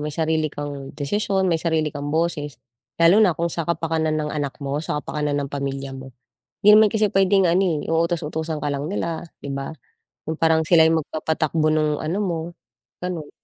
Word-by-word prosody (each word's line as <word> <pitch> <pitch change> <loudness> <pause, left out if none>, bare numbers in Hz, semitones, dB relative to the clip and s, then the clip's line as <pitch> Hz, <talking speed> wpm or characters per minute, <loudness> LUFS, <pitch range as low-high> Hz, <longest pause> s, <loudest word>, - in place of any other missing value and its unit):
May 150 0 -4
sarili 160 0 +1
kang 145 -2 -7
desisyon, 190 +4 0
may 165 - +2
sarili 160 -3 0
kang 145 0 -5
boses, 155 -4 -1 0.4
lalo 170 +5 +6
na 185 -6 +4
kung 170 0 -1
sa 170 -1 -3
kapakanan 160 -2 0
ng 150 -1 -2
anak 145 -3 -3
mo, 140 +1 -2
sa 150 -2 -3
kapakanan 150 -1 -2
ng 140 - -6
pamilya 140 -1 -4
mo. 130 -1 -10 0.5
'Di 210 +1 +7
naman 215 -1 +6
kasi 215 -1 +3
puwedeng 195 0 +3
ano, 175 -3 +1
utos-utusan 160 -1 -1
ka 145 - -2
lang 145 +4 -3
nila, 170 -4 -3 0.2
'di 140 - -7
ba? 135 0 -4 0.6
Yung 160 - -4
parang 160 -1 +3
sila'y 160 -1 +5
magpapatakbo 155 0 -1
nung 155 -1 +1
ano 165 +6 -2
mo, 170 -4 -1 0.6
ganon. 175 -5 -4
160 Hz, 180 wpm, -22 LUFS, 145-170 Hz, 0.6 s, Di